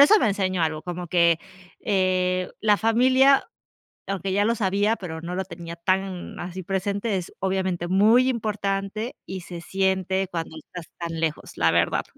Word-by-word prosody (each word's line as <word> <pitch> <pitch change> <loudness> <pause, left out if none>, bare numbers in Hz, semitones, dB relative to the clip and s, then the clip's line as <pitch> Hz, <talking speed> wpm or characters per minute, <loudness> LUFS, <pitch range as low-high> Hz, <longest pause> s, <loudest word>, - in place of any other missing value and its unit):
no, 280 - +11
eso 425 +7 +6
me 225 - +2
enseñó 185 -3 0
algo, 155 -1 -1
como 175 0 -5
que, 170 -1 +4 0.4
eh, 185 -2 +1
la 210 -1 +4
familia, 260 +5 +4 0.6
aunque 195 -1 -2
ya 205 +1 +2
lo 230 +2 +2
sabía, 205 +1 +1
pero 160 -4 -6
no 175 +2 -5
lo 190 - -2
tenía 170 -2 -8
tan 185 +1 -2
así 185 +1 -6
presente, 200 +3 -1
es 180 -2 -5
obviamente, 185 -2 -1
muy 220 +7 +5
importante, 210 -1 -2
y 190 0 -5
se 175 -1 -8
siente 190 0 0
cuando 165 -2 -4
estás 170 +1 -10
tan 165 -1 -4
lejos, 160 -2 -3
la 80 0 +3
verdad. 85 0 +2
190 Hz, 170 wpm, -24 LUFS, 175-205 Hz, 0.6 s, no